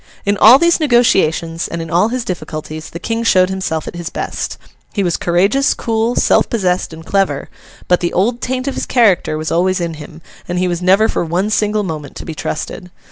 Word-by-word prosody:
In 200 +1 +2
all 220 +6 +8
these 340 +3 +3
negotiations, 190 - +2
and 170 - -5
in 165 -1 -6
all 175 +5 +3
his 245 0 -3
difficulties, 155 -4 -6
the - - -7
King 225 +6 -3
showed 185 -4 +3
himself 185 -5 -3
at - - -6
his 170 -1 -5
best. - - -4 0.4
He 200 - 0
was 175 -2 0
courageous, 195 +11 +2
cool, 225 +1 -1
self - - +3
possessed, 185 -7 0
and 160 0 -11
clever; 195 -8 0 0.4
but, 180 - +3
the 175 - -1
old 235 +7 0
taint 255 +1 -2
of 275 - -1
his - - -4
character 200 -10 +2
was 155 +1 -4
always 185 +3 +1
in 170 -1 -2
him, 155 +1 -11 0.2
and 180 - -3
he 185 +1 +1
was 175 0 -2
never 190 +4 +4
for - - -1
one 180 +6 -1
single 210 -1 +1
moment 155 -6 -6
to - - -8
be 160 - -5
trusted. 180 +4 -5
185 Hz, 210 wpm, -16 LUFS, 165-220 Hz, 0.4 s, all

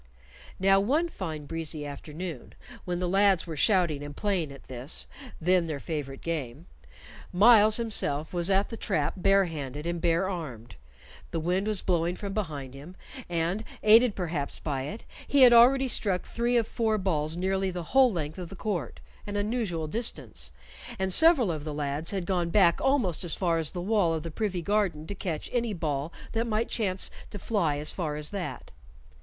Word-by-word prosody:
Now 195 +1 +5
one 295 +12 +1
fine 160 - -6
breezy 160 -1 -2
afternoon, 150 +1 -7 0.3
when 180 -1 -2
the 180 0 -1
lads 195 -1 +3
were 165 -2 -6
shouting 170 -4 +2
and 145 0 -8
playing 185 -8 -1
at 140 - -12
this, 130 +3 0 0.3
then 180 0 +2
their 150 -3 -4
favorite 140 -3 -5
game, 150 -3 -4 0.7
Myles 215 +2 +6
himself 160 -10 -2
was 175 +1 -1
at 195 +1 +2
the 230 - -6
trap 155 -10 -1
barehanded 165 -7 0
and 170 0 -2
barearmed. 165 - -2 0.6
The 165 - -2
wind 180 +5 0
was 215 -3 +3
blowing 175 0 0
from 200 +1 -5
behind 150 -10 -4
him, 145 +7 -11 0.3
and, 175 +5 -1 0.2
aided 225 +1 +6
perhaps 165 -6 -2
by 135 -4 -3
it, 210 +10 -7 0.2
he 285 - +3
had 245 -1 +9
already 260 +3 +6
struck 195 -7 +1
three 240 +1 0
of 230 - +2
four 220 -2 0
balls 160 -5 -1
nearly 190 +1 0
the 180 -1 -5
whole 265 -2 +6
length 155 -2 -4
of 175 -2 -6
the 195 - -9
court 180 - -4 0.3
an 205 - -4
unusual 205 -6 -1
distance 225 +10 -3 0.5
and 190 -1 0
several 305 - +5
of 155 -3 -4
the 150 -1 -5
lads 145 +2 -2
had 190 -3 -2
gone 175 -2 0
back 175 -2 +4
almost 250 - +1
as 175 - 0
far 170 -3 +1
as 160 -2 0
the 180 - -6
wall 190 -4 +2
of 155 - -4
the 165 - -6
privy 190 -1 -2
garden 195 -6 0
to 200 - -5
catch 175 -5 -4
any 235 -3 0
ball 150 -2 -2 0.2
that 230 +1 -1
might 220 +1 -1
chance 190 -5 +1 0.2
to - - -7
fly 175 -8 0
as 150 +1 0
far 155 -5 -3
as 150 0 -4
that. 195 -3 -6
180 Hz, 180 wpm, -28 LUFS, 155-205 Hz, 0.7 s, had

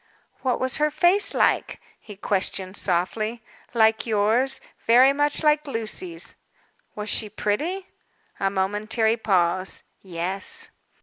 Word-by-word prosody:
"What 255 -2 0
was 260 -1 -1
her 300 0 +2
face 350 +6 +3
like?" - - +1 0.2
he 210 - -11
questioned 190 -1 -2
softly. 215 +6 -1 0.3
"Like 220 0 +3
yours. 225 +5 +2 0.2
Very 255 +4 +5
much 290 +2 +1
like 300 0 +3
Lucy's." 280 - -5 0.6
"Was 210 0 -5
she 215 -1 +1
pretty?" 300 - -2 0.5
A 195 - +1
momentary 210 +4 0
pause. 185 -4 0 0.2
"Yes." 195 - -5
220 Hz, 115 wpm, -24 LUFS, 200-290 Hz, 0.6 s, Very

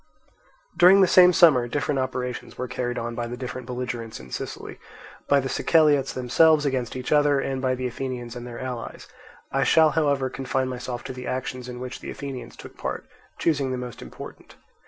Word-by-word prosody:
During 180 +4 +7
the - - +7
same 180 0 +7
summer 150 -9 +5
different 145 +2 -1
operations 125 -1 -4
were 125 - -3
carried 120 0 -3
on 115 0 -3
by 120 0 -3
the 120 +1 -6
different 125 -1 -6
belligerents 125 -3 -5
in 65 0 -13
Sicily; - - -6 0.5
by 140 - +4
the 135 - -2
Siceliots 145 -2 +3
themselves 150 +5 +4
against 130 -4 -1
each 125 -1 -5
other, 145 -2 +4
and 135 -1 -2
by 130 -1 +1
the 130 0 -4
Athenians 125 -1 -5
and 120 0 -7
their 120 -1 -8
allies: 125 -3 -6 0.4
I 135 0 +1
shall 160 +3 +5
however 140 -3 +1
confine 130 0 -2
myself 125 -1 -5
to 130 - -6
the 125 0 -8
actions 130 -1 -4
in 125 0 -7
which 125 0 -6
the - - -8
Athenians 130 -4 -7
took - - -12
part, - - -4 0.3
choosing 145 -5 +1
the 130 - -2
most 125 -1 -7
important. - - -11
130 Hz, 190 wpm, -24 LUFS, 125-140 Hz, 0.5 s, During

